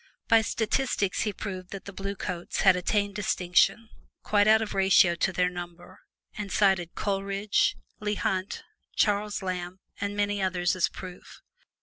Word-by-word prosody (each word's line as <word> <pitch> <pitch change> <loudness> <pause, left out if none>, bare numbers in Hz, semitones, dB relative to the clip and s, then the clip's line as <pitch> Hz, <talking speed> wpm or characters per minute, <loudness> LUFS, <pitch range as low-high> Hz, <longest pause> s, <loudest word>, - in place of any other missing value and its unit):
By 225 -1 +6
statistics 220 -2 0
he 210 - 0
proved 185 -2 -6
that 195 - -8
the 200 - -8
Blue 195 +1 -4
Coats 180 -2 -4
had 190 -2 +6
attained 200 +3 0
distinction 195 +2 +1 0.4
quite 205 0 +3
out 220 0 +6
of 220 -1 -4
ratio 190 -2 +5
to 170 +2 0
their 180 0 +1
number, 175 -1 -8 0.4
and 205 -2 -5
cited 190 -4 +2
Coleridge, 200 +1 0 0.2
Leigh 210 0 -1
Hunt, 190 -1 -2 0.3
Charles 210 -1 +1
Lamb 180 0 -4 0.2
and 200 0 -3
many 205 0 0
others 180 -2 0
as 185 - +1
proof. 185 -1 -11
195 Hz, 150 wpm, -27 LUFS, 180-205 Hz, 0.4 s, By